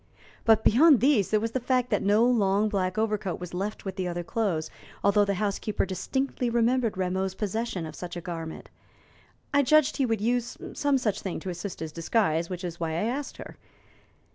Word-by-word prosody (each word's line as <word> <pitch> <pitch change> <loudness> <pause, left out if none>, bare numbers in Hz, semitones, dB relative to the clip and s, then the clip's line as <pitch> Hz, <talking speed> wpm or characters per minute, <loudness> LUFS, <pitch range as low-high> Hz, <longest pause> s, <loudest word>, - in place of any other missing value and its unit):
But 220 -1 +5
beyond 280 +3 +6
these 255 -7 +3
there 215 - +3
was 225 +1 -2
the 260 - -1
fact 250 0 0
that 210 - +2
no 210 +4 +4
long 210 -3 +2
black 185 -2 -1
overcoat 215 -4 -1
was 180 -1 -8
left 200 +4 -4
with 190 0 -5
the 185 -1 -1
other 175 0 -3
clothes, 170 -5 -1 0.3
although 205 +1 +4
the 200 0 0
housekeeper 205 +1 -1
distinctly 250 +6 -2
remembered 235 -1 +1
Rameau's 190 +1 -1
possession 210 -3 -2
of 155 - -7
such 175 +1 -7
a - - -3
garment. 165 -2 -7 0.8
I 285 - +5
judged 305 +1 +4
he 270 -3 +2
would 225 -2 0
use 240 +2 -1 0.2
some 285 -1 +2
such 220 -6 -1
thing 190 - -4
to 185 - -4
assist 175 +1 -6
his 160 -1 -4
disguise, 165 -1 0
which 180 0 -5
was 175 -1 -5
why 165 -1 -1
I 170 - -1
asked 285 +1 -5
her. - - -10
205 Hz, 195 wpm, -27 LUFS, 180-235 Hz, 0.8 s, beyond